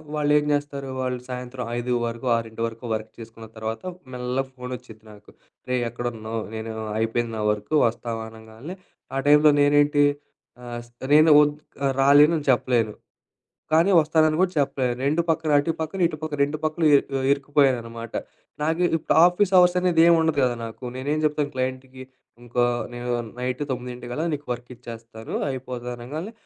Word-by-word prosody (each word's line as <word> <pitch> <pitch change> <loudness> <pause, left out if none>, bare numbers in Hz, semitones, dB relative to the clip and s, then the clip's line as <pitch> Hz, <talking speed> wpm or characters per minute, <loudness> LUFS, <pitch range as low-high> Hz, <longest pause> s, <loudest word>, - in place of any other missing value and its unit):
వాళ్ళేం 150 0 +2
జేస్తారు 140 -1 -3
వాళ్ళు 125 -1 -2
సాయంత్రం 125 0 -5
5 120 +1 -3 0.2
వరకు, 115 +2 -5
ఆరింటి 115 0 -6
వరకు 115 +2 -9
వర్క్ 110 0 -6
చేసుకున్న 115 0 -11
తర్వాత 110 0 -4 0.3
మెల్లగ 125 +2 -2
ఫోనొచ్చిద్ది 125 -3 -9
నాకు. 105 0 -17 0.4
"రేయ్! 125 -1 +1
ఎక్కడున్నావు, 115 -2 -4
నేను 110 0 -5 0.2
అయిపోయింది 115 +1 -1
నా - - -2
వర్కు 105 +8 -4
వస్తావా" 115 0 -4
అనంగాల్నే 110 +9 -10 0.4
ఆ - - +1
టైంలో 150 +1 +7
నేనేంటి. 145 0 +4 0.6
ఆహ్, 120 -1 -6
స్ - - -27 0.2
నేను 155 +1 +7
వద్ 145 0 +2 0.5
రాలేను 145 +4 +6
అని 145 - -11
చెప్పలేను, 120 -4 +1 0.8
కానీ 165 +5 +4
వస్తానని 155 0 +2
కూడా 185 -1 +2
చెప్పలేను. 135 -3 0
2 155 +4 +2
పక్కన, 160 -1 +1
అటు 145 +3 0
పక్కన, 160 +4 -4
ఇటు 155 - -7
పక్కన 155 -2 -4
2 145 +2 -2
పక్కల 155 +1 -1
యె - - +9 0.3
ఇరుక్కుపోయాననమాట. 130 -5 0 0.5
నాకు 160 +3 0 0.2
ఇప్పుడు 155 - -1
ఆఫీస్ 180 +2 +1
అవర్స్ 180 0 +5
అనేది 180 -3 +3
ఏం 170 - +7
ఉండదు 160 -2 +1
కదా 125 -1 +2
నాకు 115 +3 -10
నేనేం 140 +4 -2
చెప్తాను 150 -1 0
క్లయింట్‌కి 130 0 -4 0.4
ఇంకో 120 0 -1 0.3
నేను 120 0 -5 0.3
నైట్ 125 +2 -3
తొమ్మిదింటికల్లా 125 +3 -4
నీకు 145 0 -5
వర్క్ 120 0 -5
ఇచ్చేస్తాను, 115 -2 -10 0.2
అయిపోతది 125 -2 -5
అనంగాల్నే, 150 - -6
130 Hz, 150 wpm, -24 LUFS, 120-150 Hz, 0.8 s, యె